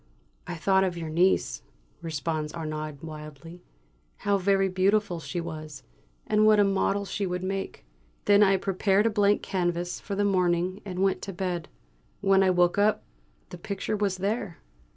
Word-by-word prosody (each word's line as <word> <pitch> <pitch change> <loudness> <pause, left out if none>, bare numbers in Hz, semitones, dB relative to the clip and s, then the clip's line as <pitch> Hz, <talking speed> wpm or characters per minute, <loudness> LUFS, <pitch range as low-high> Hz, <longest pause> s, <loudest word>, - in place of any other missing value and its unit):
"I - - -4
thought 190 +3 +2
of 180 -2 -1
your 165 -2 -5
niece," 180 +4 +2 0.4
responds 155 -1 -3
Arnaud 155 -2 -5
wildly. 155 +2 -9 0.6
"How 200 0 +1
very 195 0 +2
beautiful 190 -1 +1
she 175 +2 -5
was, 155 -3 -7 0.4
and 215 0 +2
what 215 -1 +6
a - - +6
model 200 0 +1
she 200 0 -3
would 180 0 -3
make. 195 - -4 0.4
Then 205 0 +5
I 195 -1 +5
prepared 195 +2 +1
a 230 - +3
blank 205 -1 +2
canvas 175 -1 -2
for 200 - -5
the 205 +1 +1
morning, 180 -1 +1
and 185 -1 -2
went 195 -1 +1
to 195 - -6
bed. 175 -2 -3 0.5
When 195 -1 +4
I 190 - +4
woke 180 +1 +3
up 210 +1 +2 0.5
the - - -9
picture 200 +1 -3
was 200 -2 -1
there." 200 -1 -2
185 Hz, 165 wpm, -27 LUFS, 170-200 Hz, 0.6 s, what